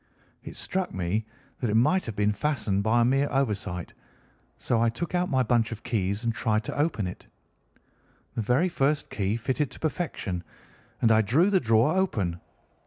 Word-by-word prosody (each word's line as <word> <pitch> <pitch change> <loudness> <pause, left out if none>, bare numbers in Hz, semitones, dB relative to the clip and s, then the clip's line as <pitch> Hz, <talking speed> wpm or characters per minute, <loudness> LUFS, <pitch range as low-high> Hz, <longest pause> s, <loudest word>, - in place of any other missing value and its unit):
It - - -9
struck 190 -1 -2
me 95 +5 -2 0.3
that 120 - -1
it 105 - +1
might 155 +11 +3
have 115 - -4
been 105 0 +2
fastened 105 -5 0
by 110 +3 +3
a - - +4
mere 135 +3 +2
oversight, 105 -10 -2 0.6
so 115 - 0
I 115 - +4
took 160 +10 -5
out 180 0 +1
my 130 -1 +2
bunch 120 -1 +2
of 115 -1 -7
keys 100 -1 -1
and 115 -1 0
tried 110 -2 0
to - - -5
open 145 - 0
it. 90 - -7 1.1
The - - -2
very 125 - +2
first 150 -4 0
key 100 +1 -1
fitted 130 +4 -1
to - - -13
perfection, 135 - -3 0.6
and 115 - +5
I 110 0 +6
drew 145 - +3
the 190 - +4
drawer 115 +5 +3
open. 100 - 0
115 Hz, 180 wpm, -27 LUFS, 105-145 Hz, 1.1 s, I